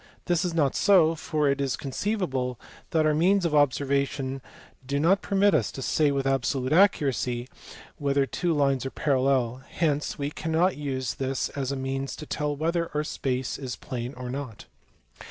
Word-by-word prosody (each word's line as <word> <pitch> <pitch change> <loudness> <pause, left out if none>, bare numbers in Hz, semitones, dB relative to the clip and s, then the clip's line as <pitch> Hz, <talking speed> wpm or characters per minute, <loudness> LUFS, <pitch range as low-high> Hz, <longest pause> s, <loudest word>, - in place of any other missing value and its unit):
This 175 0 +1
is 175 -2 -2
not 145 -5 +2
so, 175 -5 +5
for 155 -2 -1
it 140 0 +1
is 135 -5 0
conceivable 135 - -2 0.3
that 160 -2 +2
our 155 - +3
means 180 +4 +3
of 165 - 0
observation 140 -1 +1 0.4
do 140 +2 -1
riot 180 +6 +3
permit 200 0 +3
us 135 -9 +1
to 135 - -6
say 150 +2 +2
with 140 -1 -1
absolute 135 0 0
accuracy 135 - +2 0.5
whether 140 -1 +2
two 175 +7 -1
lines 140 -4 +2
are 135 - -3
parallel; 130 -3 +1
hence 150 -3 -1
we 145 0 -3
cannot 165 +4 +1
use 130 -4 -3
this 135 -1 -2
as 135 -1 -3
a - - -1
means 135 0 -3
to 155 - -8
tell 150 0 -2
whether 165 +3 -1
our 150 - +1
space 130 -4 -2
is 130 -4 -4
plane 125 +2 -6
or 125 -1 -5
not. 130 -5 -6
140 Hz, 170 wpm, -26 LUFS, 130-160 Hz, 0.5 s, so